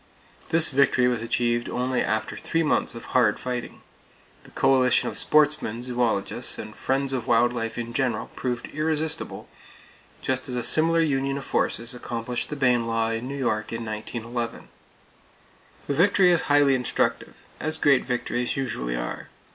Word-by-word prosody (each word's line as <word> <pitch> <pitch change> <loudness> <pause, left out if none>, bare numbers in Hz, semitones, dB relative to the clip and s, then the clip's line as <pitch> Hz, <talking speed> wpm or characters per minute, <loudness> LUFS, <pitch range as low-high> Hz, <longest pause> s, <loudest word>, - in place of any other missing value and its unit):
This 165 -1 +3
victory 130 -2 +3
was 120 -2 0
achieved 120 +1 0
only 125 0 0
after 110 +2 -1
three 165 0 -1
months 150 - +1
of 115 - -9
hard 120 -5 +3
fighting. 125 -1 -5 0.6
The - - -14
coalition 130 -2 +3
of - - -8
sportsmen, 150 -6 +2
zoologists 120 -5 -1
and 110 - -8
friends 135 0 -1
of 125 -4 -3
wild 120 +1 +3
life 115 -1 -3
in 120 0 -4
general 130 -1 -1
proved 125 -1 -3
irresistible, 155 +1 -2 0.7
just 130 0 -1
as 125 - -2
a 120 - -1
similar 165 +1 +3
union 135 -3 0
of 140 - -6
forces 115 +2 -1
accomplished 120 0 -4
the 150 - -4
Bayne 125 -4 +2
law 115 0 0
in 115 +2 -3
New 140 +1 -5
York 110 -5 -1
in 115 0 -4
1911. 115 +2 -5 1.2
The 145 - -1
victory 180 +3 +4
is 170 -3 +1
highly 145 -1 +5
instructive, 125 -2 -1
as 155 0 -2
great 140 -4 +4
victories 125 0 -2
usually 65 - -2
are. - - -5
125 Hz, 155 wpm, -25 LUFS, 115-140 Hz, 1.2 s, highly